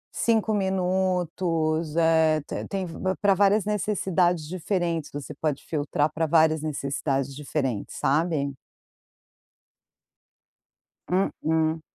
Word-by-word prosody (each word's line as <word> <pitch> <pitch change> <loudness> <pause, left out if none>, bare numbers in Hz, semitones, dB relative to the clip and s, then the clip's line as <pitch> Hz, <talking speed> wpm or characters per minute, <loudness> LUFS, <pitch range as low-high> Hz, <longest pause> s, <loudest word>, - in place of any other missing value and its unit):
5 220 -1 +2
minutos. 180 -4 0
Eh, 160 -1 +4
te - - -4
tem 195 -2 -3
v 165 - -8 0.3
pra 200 -1 +5
várias 200 +1 +3
necessidades 185 -6 0
diferentes. 175 -3 -2
Você 145 +1 -6
pode 150 -2 -2
filtrar 150 -1 0
pra 160 +1 0
várias 160 -1 +4
necessidades 140 -2 -2
diferentes, 135 -6 -3
sabe. 145 -1 +1 2.6
Mm-mm. 160 -3 +1
160 Hz, 95 wpm, -25 LUFS, 150-185 Hz, 2.6 s, pra